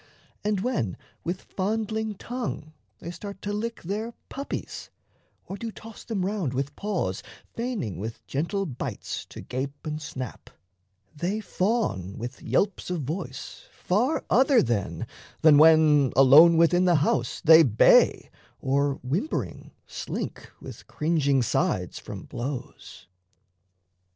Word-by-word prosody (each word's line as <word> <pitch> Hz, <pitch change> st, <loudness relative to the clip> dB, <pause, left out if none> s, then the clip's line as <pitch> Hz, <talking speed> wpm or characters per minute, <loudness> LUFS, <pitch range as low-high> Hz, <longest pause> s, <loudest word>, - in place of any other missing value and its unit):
And 205 Hz, -2 st, 0 dB
when 135 Hz, -, -1 dB, 0.3 s
with 180 Hz, +2 st, -4 dB
fondling 220 Hz, +2 st, -2 dB
tongue 205 Hz, -9 st, -5 dB, 0.2 s
they 170 Hz, -, -7 dB
start 200 Hz, +3 st, -8 dB
to 205 Hz, -, -2 dB
lick 230 Hz, +3 st, -4 dB
Their 215 Hz, +6 st, -4 dB
puppies, 280 Hz, +1 st, -6 dB, 0.6 s
or 195 Hz, -, -6 dB
do 225 Hz, +2 st, -5 dB
toss 225 Hz, 0 st, -12 dB
them 205 Hz, -6 st, -2 dB
round 190 Hz, -10 st, -2 dB
with 140 Hz, +2 st, -2 dB
paws, 185 Hz, -, -2 dB, 0.3 s
Feigning 225 Hz, -, -3 dB
with 110 Hz, +3 st, -6 dB
gentle 185 Hz, +8 st, -2 dB
bites 130 Hz, -8 st, -5 dB
to -, -, -10 dB
gape 135 Hz, +3 st, -5 dB
and 155 Hz, 0 st, -4 dB
snap, 130 Hz, -5 st, -7 dB, 0.7 s
They 180 Hz, +8 st, -2 dB
fawn 185 Hz, -, -1 dB
with 120 Hz, +3 st, -7 dB
yelps 200 Hz, -2 st, 0 dB
of 175 Hz, -5 st, -2 dB
voice 140 Hz, -2 st, -6 dB
far 240 Hz, -, 0 dB
other 265 Hz, +2 st, +4 dB
then 100 Hz, -9 st, -2 dB, 0.4 s
Than 150 Hz, -2 st, +7 dB
when, 155 Hz, -4 st, +6 dB
alone 145 Hz, +6 st, +8 dB
within 175 Hz, +2 st, +4 dB
the 175 Hz, -2 st, +4 dB
house, 140 Hz, -5 st, +1 dB
they 160 Hz, +1 st, +8 dB
bay, 120 Hz, -9 st, +4 dB, 0.3 s
Or 140 Hz, +1 st, +1 dB
whimpering 170 Hz, -, -3 dB, 0.2 s
slink -, -, -6 dB
with -, -, -11 dB
cringing 145 Hz, -4 st, +1 dB
sides -, -, -1 dB
from -, -, -8 dB
blows. 120 Hz, -7 st, -7 dB
165 Hz, 125 wpm, -26 LUFS, 135-205 Hz, 0.7 s, alone